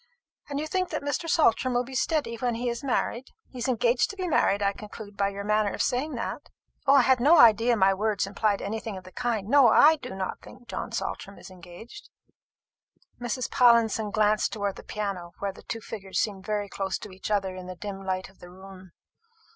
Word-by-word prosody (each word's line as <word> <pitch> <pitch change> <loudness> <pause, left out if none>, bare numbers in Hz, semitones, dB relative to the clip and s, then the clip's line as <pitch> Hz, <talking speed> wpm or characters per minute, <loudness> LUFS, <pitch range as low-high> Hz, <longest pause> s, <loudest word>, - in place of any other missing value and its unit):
And 285 0 -3
you 305 - -2
think 370 +3 -1
that 310 - -4
Mr. 285 +4 -2
Saltram 255 -6 +3
will 245 - +2
be 265 +2 -11
steady 290 -1 0
when 240 0 -1
he 240 +1 -2
is 235 +3 -4
married? 255 -1 -1 0.2
He 255 - -9
is 240 - -2
engaged 240 0 +2
to 400 - -7
be 370 -2 -3
married, 205 - +2
I 200 0 +2
conclude 210 0 -10
by 200 0 +1
your 200 0 -6
manner 210 0 +1
of - - -2
saying 265 +5 -1
that." - - -5 0.4
"I 275 -1 +6
had 260 0 +4
no 300 +8 +6
idea 230 +1 +6
my 195 -1 +4
words 210 0 0
implied 200 +1 -1
anything 220 0 -4
of 185 - -10
the 185 - -13
kind. 225 -3 -2
No, 275 +1 +6
I 305 +7 +6
do 250 -8 -8
not 190 -1 -4
think 240 - -15
John 230 - -5
Saltram 200 -3 -5
is - - -12
engaged." 185 - -12 1.1
Mrs. 245 +1 -3
Pallinson 230 -4 +4
glanced 215 0 +2
towards 200 -2 -3
the - - -10
piano, 195 -5 -5
where 200 -1 -3
the - - -14
two 225 - -6
figures 195 -3 -5
seemed 200 -2 -2
very 210 -1 -1
close 195 -1 -3
to 210 - -10
each 185 +2 -7
other 195 -3 0
in 185 -1 -8
the 185 - -7
dim 195 +1 -7
light 185 -1 -2
of 190 - -22
the 175 - -12
room. 190 0 -13
215 Hz, 215 wpm, -27 LUFS, 195-250 Hz, 1.1 s, I